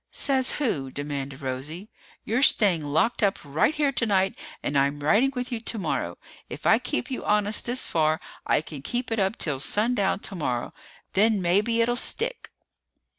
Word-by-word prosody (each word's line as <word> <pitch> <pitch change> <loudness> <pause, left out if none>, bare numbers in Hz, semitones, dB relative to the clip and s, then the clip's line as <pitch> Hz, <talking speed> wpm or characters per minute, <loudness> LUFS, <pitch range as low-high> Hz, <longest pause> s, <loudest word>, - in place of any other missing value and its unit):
"Says 265 -2 0
who?" 155 - -1
demanded 140 -1 -5
Rosie. 145 +10 -5 0.3
"You're 230 +4 0
staying 195 - +4
locked 155 +13 +1
up 200 -2 +2
right 150 - +1
here 295 -2 +1
tonight 200 -6 +1 0.3
and 145 - -2
I'm 140 +1 +1
riding 210 - +3
with 250 +1 -4
you 235 - -2
tomorrow. 165 - -2 0.3
If - - -8
I - - +5
kept 120 - -3
you 255 - -3
honest 210 +1 +1
this 245 +2 0
far, 155 0 +1 0.2
I - - +2
can 150 -3 -9
keep 240 - -3
it 225 - 0
up 195 +2 0
till 145 -5 0
sundown 205 - +2
tomorrow! 145 - -3 0.4
Then 210 +1 +3
maybe 205 +6 +2
it'll 240 +1 +2
stick!" 465 - 0
195 Hz, 165 wpm, -25 LUFS, 145-235 Hz, 0.4 s, I